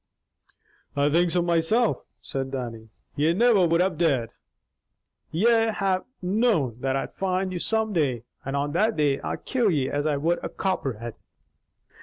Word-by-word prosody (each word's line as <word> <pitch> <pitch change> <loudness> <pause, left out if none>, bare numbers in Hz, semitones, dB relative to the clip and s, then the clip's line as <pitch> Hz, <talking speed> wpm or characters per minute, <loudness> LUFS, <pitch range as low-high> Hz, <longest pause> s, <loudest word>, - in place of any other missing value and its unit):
"I 145 +1 +2
think 175 +3 +3
so 175 +1 +1
myself," 175 +8 +1
said 135 -1 -3
Dannie. 115 -4 -6 0.3
"Ye 155 +3 +2
never 210 -3 +4
would 165 +1 +3
have 180 -4 0
dared. 135 -9 +1 1.0
Ye'd 225 +5 +3
have 190 -2 0 0.2
known 180 - +1
that 135 +1 -1
I'd 135 - -3
find 185 0 -1
out 175 - -3
some 220 -1 +1
day, 135 - 0 0.2
and 135 +1 -3
on 145 +1 -1
that 215 +8 +2
day, 145 -3 +2
I'd - - -5
kill 245 -5 +2
ye 140 -7 0
as 145 +1 0
I 150 -2 +1
would 165 +5 0
a - - -3
copperhead." 125 - -3
165 Hz, 160 wpm, -25 LUFS, 140-195 Hz, 1.0 s, never